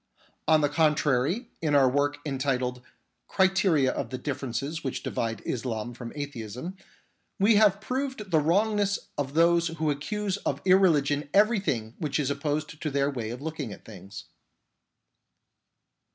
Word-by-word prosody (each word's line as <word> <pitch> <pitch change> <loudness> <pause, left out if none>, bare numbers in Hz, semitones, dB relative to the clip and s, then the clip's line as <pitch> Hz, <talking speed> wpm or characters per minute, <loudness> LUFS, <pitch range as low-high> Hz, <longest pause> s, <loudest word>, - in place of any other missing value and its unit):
On 155 0 +5
the 145 - +3
contrary, 150 - +1
in 150 -3 +1
our 135 -2 +6
work 145 +2 +1
entitled 130 -3 -1 0.5
Criteria 190 -8 +3
of - - -4
the 130 - -4
differences 140 +3 -4
which 135 - -3
divide 115 -1 -3
Islam 120 -1 -3
from 120 0 -8
Atheism, 140 - -6 0.6
we 205 +2 +5
have 205 -2 +5
proved 255 -3 -4
the 160 - +5
wrongness 200 +5 +2 0.2
of 140 0 -3
those 170 +1 +4
who 160 -2 -1
accuse 200 +7 -2
of - - -2
irreligion 150 -7 +3
everything 195 - +2
which 150 -2 -1
is 140 -1 0
opposed 150 +1 -3
to 155 - -1
their 140 0 +1
way 120 -5 -4
of 125 +4 -7
looking 155 -7 -4
at - - -11
things. 100 -1 -10
150 Hz, 140 wpm, -27 LUFS, 130-185 Hz, 0.6 s, our